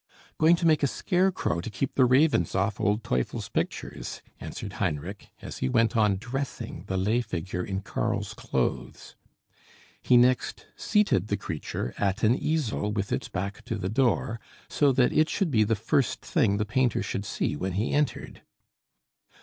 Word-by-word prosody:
"Going 160 +2 +6
to 170 - -2
make 155 -3 +4
a 140 - +3
scarecrow 180 - 0
to 105 - -5
keep 130 +4 -3
the 130 - +4
ravens 130 - +3
off 100 +2 0
old 105 +2 +1
Teufel's 65 -1 -2
pictures," - - -4 0.2
answered - - -7
Heinrich, 85 +7 -3
as - - -7
he 65 - 0
went 115 - +2
on 105 -3 +3
dressing 135 +5 -5
the 95 - -1
lay 105 +6 +2
figure 90 -4 -4
in 95 0 -3
Karl's - - -2
clothes. - - -3 0.9
He 125 - +5
next 125 +1 +2
seated 205 - +2
the 100 - 0
creature 75 -5 -4
at 100 +1 0
an 110 +2 +5
easel 130 -8 -1
with 100 -1 -2
its - - -2
back 100 +1 -4
to 115 - -3
the 95 -3 -3
door, 115 -1 +1 0.3
so 145 -2 +3
that 125 -1 +3
it 155 0 +3
should 195 -6 0
be 110 -4 +4
the 110 +2 +1
first 120 +4 0
thing 110 -11 +2
the 105 - 0
painter 120 +2 +1
should 100 - -3
see - - -2
when 95 +5 -3
he 105 +6 -1
entered. 150 0 -1
110 Hz, 170 wpm, -27 LUFS, 100-135 Hz, 0.9 s, Going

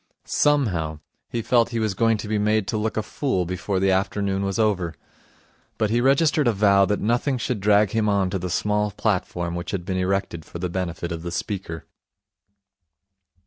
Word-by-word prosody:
Somehow, 95 - +1 0.3
he 115 - -3
felt 120 -1 +3
he 120 - -3
was 110 -3 0
going 115 +2 +2
to 105 - -6
be 105 0 0
made 105 -1 +1
to - - -1
look 110 +1 -2
a 110 - 0
fool 100 -7 -1
before 90 +2 -2
the 95 0 +3
afternoon 95 0 0
was 100 -1 -1
over. 95 -7 +1 0.8
But 110 -1 0
he 120 +1 +2
registered 140 +2 +3
a - - +5
vow 100 -1 +4
that 105 +1 0
nothing 120 +5 +1
should 120 -1 -2
drag 105 0 +4
him 110 -2 +1
on 100 -2 +1
to 95 - -1
the 90 +1 -4
small 105 +3 0
platform 90 -4 -1
which 85 0 -5
had 90 -4 -3
been 95 -1 -2
erected 90 -3 -1
for - - -9
the 90 +1 -3
benefit 85 -1 -3
of 85 -1 -4
the 85 - -5
speaker. 90 -3 -4
100 Hz, 190 wpm, -23 LUFS, 90-110 Hz, 0.8 s, a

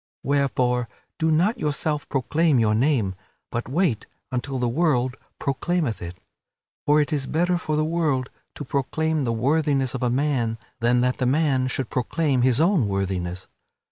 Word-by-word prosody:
Wherefore, 125 -4 +1 0.3
do 160 - +2
not 180 +10 +2
yourself 150 -1 -2
proclaim 150 +3 +2
your 110 -2 +3
name, 115 -5 +2 0.4
but 120 +1 -3
wait 140 - 0 0.2
until 130 +2 -2
the 125 -1 0
world 130 -2 +1 0.2
proclaimeth 140 - -1
it; 85 +1 -7 0.7
for 150 +1 +5
it 150 +2 0
is 140 -3 -1
better 175 +3 +1
for 155 -3 -2
the 155 0 +1
world 155 -6 0 0.2
to 145 - -6
proclaim 150 +2 -1
the 115 - 0
worthiness 135 +2 +1
of 135 - -4
a 125 - +1
man 125 -4 0 0.2
than 120 +1 +3
that 125 0 0
the 130 - +1
man 135 -2 +2
should 130 +1 -3
proclaim 135 +1 0
his 125 0 +3
own 165 - +3
worthiness. 95 -2 -2
135 Hz, 160 wpm, -24 LUFS, 120-155 Hz, 0.7 s, for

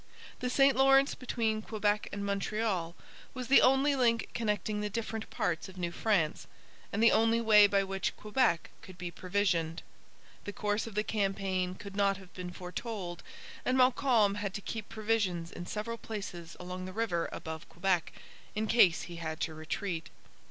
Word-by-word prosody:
The 250 - -1
St 275 +1 +4
Lawrence 270 +1 +5
between 225 -4 -1
Quebec 210 -1 0
and 200 0 -4
Montreal 200 -3 -1 0.4
was 255 -1 -5
the 275 - +8
only 270 +2 +4
link 235 -3 +2
connecting 210 -2 -1
the 210 - -2
different 220 +1 -4
parts 170 +2 -2
of 190 - -13
New 175 -1 -2
France, 170 -6 0 0.4
and 215 +3 0
the 230 - +7
only 225 +1 +3
way 210 -3 +7
by 200 -1 +2
which 195 -1 -2
Quebec 215 -5 +1
could 185 -1 -12
be 180 -1 -5
provisioned. 180 -3 0 0.6
The 205 - -5
course 210 +2 -1
of 220 - -9
the 210 - +1
campaign 195 -3 -1
could 200 +1 -9
not 200 -1 +2
have 190 -2 -15
been 180 -1 -6
foretold; 180 0 -6 0.4
and 255 +1 +1
Montcalm 250 -5 +4
had 200 -2 -3
to 205 - -4
keep 220 +1 -5
provisions 205 -6 -1
in 175 - -7
several 230 +2 -4
places 180 -6 -7
along 180 +1 -6
the 185 - -7
river 200 -6 -1
above 160 0 -7
Quebec, 175 -2 0 0.4
in 215 +1 0
case 210 -7 +5
he 170 -1 -8
had 160 -1 -4
to 160 - -1
retreat. 165 +2 -4
205 Hz, 170 wpm, -31 LUFS, 180-225 Hz, 0.6 s, the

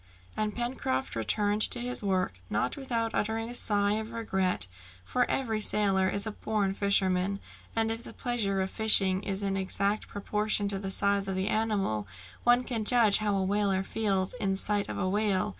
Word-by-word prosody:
And 215 -1 -2
Pencroft 240 - -2
returned 205 - 0
to 245 - 0
his 245 +1 -2
work, 185 - -1
not 105 - 0
without 235 -5 -2
uttering 225 +2 -1
a - - -7
sigh 205 -4 +1
of 220 +1 -7
regret, 190 - -1 0.4
for 250 - 0
every 225 -5 -1
sailor 195 -3 +3
is 200 +2 0
a 220 - -3
born 210 -2 -1
fisherman, 195 -1 +1 0.4
and 225 0 +1
if 225 +1 -4
the - - -9
pleasure 215 -6 -1
of 190 - -3
fishing 195 -4 +3
is 195 0 -4
in 195 -1 -1
exact 200 +2 0
proportion 210 0 -1
to 195 -1 +3
the 195 0 -4
size 200 0 +2
of 190 - -2
the 190 +1 -1
animal, 200 - -1 0.4
one 245 +1 +4
can 235 -4 -2
judge 220 -2 +5
how 210 -1 0
a 195 - 0
whaler 195 -1 +1
feels 195 -2 -1
in 195 -6 -1
sight 205 +1 0
of - - -4
a 185 - -1
whale. 200 -1 +1
205 Hz, 185 wpm, -29 LUFS, 195-220 Hz, 0.4 s, judge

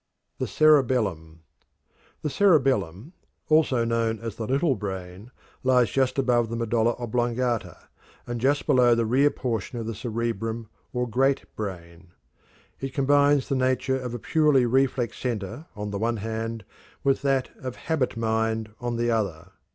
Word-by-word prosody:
The - - -1
Cerebellum. 115 - +2 0.8
The 150 - 0
cerebellum, 135 - +2 0.4
also 150 -7 +3
known 115 -1 0
as 115 -1 -6
"the 110 -1 -5
little 140 +3 +2
brain," 95 0 -6 0.3
lies 125 -4 +3
just 135 0 +1
above 120 -3 +2
the 115 - -3
medulla 115 0 +1
oblongata, 120 -4 -1 0.5
and 120 -1 -4
just 140 +3 +2
below 125 -4 +5
the 115 0 +1
rear 135 +6 +4
portion 120 -3 -3
of 115 - -4
the 115 - -3
cerebrum 115 0 -3 0.2
or 125 -1 -1
great 135 +4 +1
brain. 85 -3 -7 0.7
It 135 0 -5
combines 145 0 +3
the - - -1
nature 130 +1 +1
of 125 -2 -5
a - - -2
purely 150 0 +3
reflex 130 -1 +1
center 120 - -4
on 105 0 -5
the 100 - -3
one 115 +1 0
hand, 110 0 -4 0.4
with 135 -1 +2
that 135 -2 0
of 130 -1 -6
"habit 145 -8 -1
mind" 110 -1 -1
on 120 -1 -3
the 120 0 +1
other. 90 -6 -2
120 Hz, 150 wpm, -25 LUFS, 110-130 Hz, 0.8 s, below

